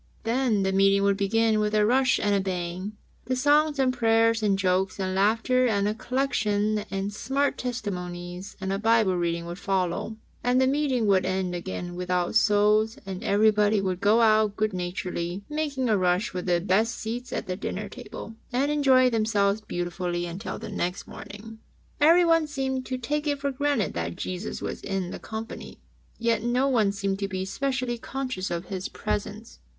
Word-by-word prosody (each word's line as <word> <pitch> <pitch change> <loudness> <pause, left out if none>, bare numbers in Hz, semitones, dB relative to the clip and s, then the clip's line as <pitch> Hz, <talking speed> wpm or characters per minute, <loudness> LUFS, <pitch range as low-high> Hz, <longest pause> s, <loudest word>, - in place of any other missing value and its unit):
Then 230 -3 +1
the 190 - +1
meeting 195 +1 +4
would 200 0 +3
begin 220 +2 +2
with 210 0 0
a 210 0 +4
rush 255 +2 +3
and 205 - +1
a 200 - +3
bang, 185 +1 -3 0.3
and 255 0 0
songs 295 +2 +3
and 260 -2 +2
prayers 230 -1 +3
and 200 -2 +2
jokes 190 0 0
and 185 -1 -1
laughter 225 +6 +2
and 205 -1 +1
collection 215 -5 0
and 195 +1 -3
smart 275 +6 0
testimonies 180 -6 -5
and 190 0 -2
a 195 - -1
Bible 220 -3 +3
reading 170 -1 -1
would 175 +2 -7
follow, 190 +3 -1 0.3
and 250 +1 +3
the 260 - +4
meeting 265 -3 +1
would 195 -2 +3
end 185 -1 -1
again 175 0 -5
without 180 0 -1
souls, 215 0 +3
and 190 -1 -6
every 215 +2 +4
body 210 0 +2
would 185 -2 -2
go 210 +3 +4
out 215 -2 +4
good 215 -1 0
naturedly, 180 0 -4
make 300 -2 -3
a 250 -5 +2
rush 180 +1 +1
for 180 - -4
the 175 -1 +1
best 205 +6 +1
seats 240 +3 -5
at - - -3
the 180 - -3
dinner - - -4
table, 225 - -9 0.2
and 270 +4 +1
enjoy 265 -3 +4
themselves 215 -3 +1
beautifully 175 -2 -3
until 175 +5 -5
the - - -7
next 180 -2 -3
meeting. 220 +2 -10 0.4
Everyone 330 +1 +5
seemed 265 -3 -3
to 255 - -2
take 295 +5 -2
it 285 -1 0
for 280 0 -1
granted 280 -5 0
that 85 0 -3
Jesus 185 +3 -5
was - - -4
in 190 -2 -3
the - - -6
company, 220 +1 -7 0.4
yet 230 -2 +1
no 245 +4 +1
one 225 -7 +3
seemed 200 -1 -2
to 200 - -1
be 190 -1 -3
specially 255 +2 -2
conscious 255 -8 -4
of 170 +1 -3
His 190 0 -5
Presence. 210 +2 -4
210 Hz, 180 wpm, -26 LUFS, 190-245 Hz, 0.4 s, Everyone